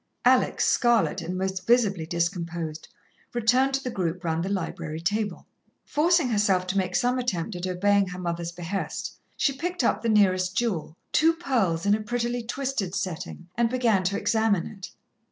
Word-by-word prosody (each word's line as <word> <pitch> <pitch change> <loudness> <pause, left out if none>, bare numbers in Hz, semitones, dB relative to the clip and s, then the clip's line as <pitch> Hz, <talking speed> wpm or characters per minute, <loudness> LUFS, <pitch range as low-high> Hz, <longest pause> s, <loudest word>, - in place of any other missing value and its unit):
Alex, - - +4
scarlet, 235 -6 +3
and 175 +2 -4
most 190 0 -3
visibly 205 -9 +3
discomposed, 170 -2 -3 0.5
returned 250 +3 +3
to 270 0 -1
the 250 - -3
group 180 -3 -2
round 165 0 -1
the 190 - -2
library 165 -5 -3
table. 205 +2 -2 0.4
Forcing 325 -2 +2
herself 205 -4 +2
to 185 +2 -2
make 185 -1 -2
some 250 +1 +2
attempt 205 -5 -2
at 175 +1 -3
obeying 200 +2 +2
her 180 0 -6
mother's 170 -1 -3
behest, 175 +3 -4 0.2
she 275 - +2
picked 350 +2 -3
up - - +2
the 230 - 0
nearest 185 -3 +3
jewel, 185 -9 -1 0.2
two 325 +1 +4
pearls 230 - 0
in 200 - +4
a 215 - +1
prettily 240 +2 -2
twisted 235 -5 -3
setting, 180 -2 -4
and 235 0 +2
began 235 -6 +2
to 200 +2 +1
examine 220 -3 +1
it. 195 -3 -8
200 Hz, 170 wpm, -26 LUFS, 180-240 Hz, 0.5 s, Alex